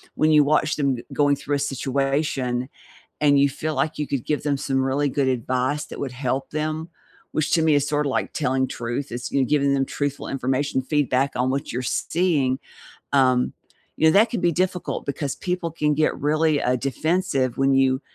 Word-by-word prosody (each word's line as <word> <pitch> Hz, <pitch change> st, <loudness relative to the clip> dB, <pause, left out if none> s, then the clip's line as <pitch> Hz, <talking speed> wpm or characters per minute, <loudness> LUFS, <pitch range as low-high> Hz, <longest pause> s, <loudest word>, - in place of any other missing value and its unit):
when 155 Hz, 0 st, +3 dB
you 150 Hz, -1 st, +6 dB
watch 155 Hz, +1 st, +2 dB
them 140 Hz, -3 st, +1 dB
g 120 Hz, -, -8 dB
going 145 Hz, -1 st, +3 dB
through 145 Hz, +1 st, -2 dB
a -, -, -1 dB
situation 135 Hz, -2 st, -1 dB, 0.5 s
and 145 Hz, -1 st, +4 dB
you 140 Hz, 0 st, +5 dB
feel 155 Hz, +3 st, -4 dB
like 155 Hz, +1 st, 0 dB
you 150 Hz, -1 st, -3 dB
could 135 Hz, -4 st, -3 dB
give 150 Hz, -, -1 dB
them 145 Hz, -1 st, 0 dB
some 135 Hz, -1 st, -1 dB
really 135 Hz, +2 st, +1 dB
good 140 Hz, 0 st, 0 dB
advice 130 Hz, +3 st, -1 dB
that -, -, -8 dB
would 135 Hz, -3 st, -3 dB
help 130 Hz, +1 st, -2 dB
them, 155 Hz, +1 st, -3 dB, 0.4 s
which 155 Hz, +1 st, -1 dB
to 165 Hz, -1 st, +4 dB
me 160 Hz, -1 st, +4 dB
is 145 Hz, 0 st, +1 dB
sorta 150 Hz, -1 st, 0 dB
like 130 Hz, -, -1 dB
telling 130 Hz, -2 st, 0 dB
truth 120 Hz, +1 st, -4 dB
is 120 Hz, 0 st, -4 dB
you 135 Hz, -1 st, +2 dB
giving 140 Hz, +1 st, +2 dB
them 135 Hz, -1 st, +1 dB
truthful 145 Hz, +1 st, -3 dB
information 135 Hz, +1 st, -1 dB
feedback 140 Hz, -1 st, +1 dB
on 125 Hz, +1 st, +1 dB
what 135 Hz, +1 st, -2 dB
you're 125 Hz, -, -2 dB
seeing, 140 Hz, -2 st, 0 dB, 0.5 s
um, 130 Hz, -2 st, +3 dB, 0.4 s
you 160 Hz, -, +3 dB
know, 160 Hz, -, +6 dB
that 220 Hz, +3 st, +5 dB
can 235 Hz, -, -2 dB
be 170 Hz, -, +2 dB
difficult 180 Hz, +1 st, -2 dB
because 140 Hz, 0 st, -3 dB
people 180 Hz, -2 st, -2 dB
can 150 Hz, -2 st, 0 dB
get 155 Hz, +1 st, +1 dB
really, 155 Hz, 0 st, +1 dB
uh, 125 Hz, +1 st, +2 dB
defensive 135 Hz, -, -1 dB
when 135 Hz, 0 st, +3 dB
you 135 Hz, 0 st, +3 dB
140 Hz, 200 wpm, -23 LUFS, 130-155 Hz, 0.5 s, you